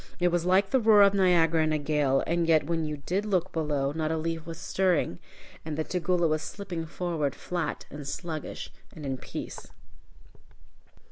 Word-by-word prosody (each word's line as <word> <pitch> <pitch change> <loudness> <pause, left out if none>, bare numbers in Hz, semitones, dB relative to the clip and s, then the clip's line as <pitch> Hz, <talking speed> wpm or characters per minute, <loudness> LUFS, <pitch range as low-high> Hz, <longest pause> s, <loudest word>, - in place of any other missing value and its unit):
It 175 0 +3
was 175 -1 0
like 190 +2 +3
the 265 - +4
roar 215 -3 +7
of 200 0 +5
Niagara 170 -4 +4
in 155 - +1
a 155 - +2
gale, 145 -2 +1
and 170 0 0
yet 160 -3 +4
when 165 0 -1
you 150 -1 -3
did 185 +8 -2
look 190 -3 0
below, 150 -4 0
not 155 +1 -2
a 160 - 0
leaf 165 0 -3
was 165 -1 -6
stirring, 180 - 0 0.4
and 155 -1 -4
the 160 - 0
Tugela 180 0 +1
was 155 0 0
slipping 175 -2 -5
forward, 160 -5 -2
flat 175 -4 -3
and 145 -1 -7
sluggish, 155 +1 -5 0.2
and 150 - -8
in 135 -1 -2
peace. - - -7
165 Hz, 185 wpm, -28 LUFS, 155-180 Hz, 0.4 s, roar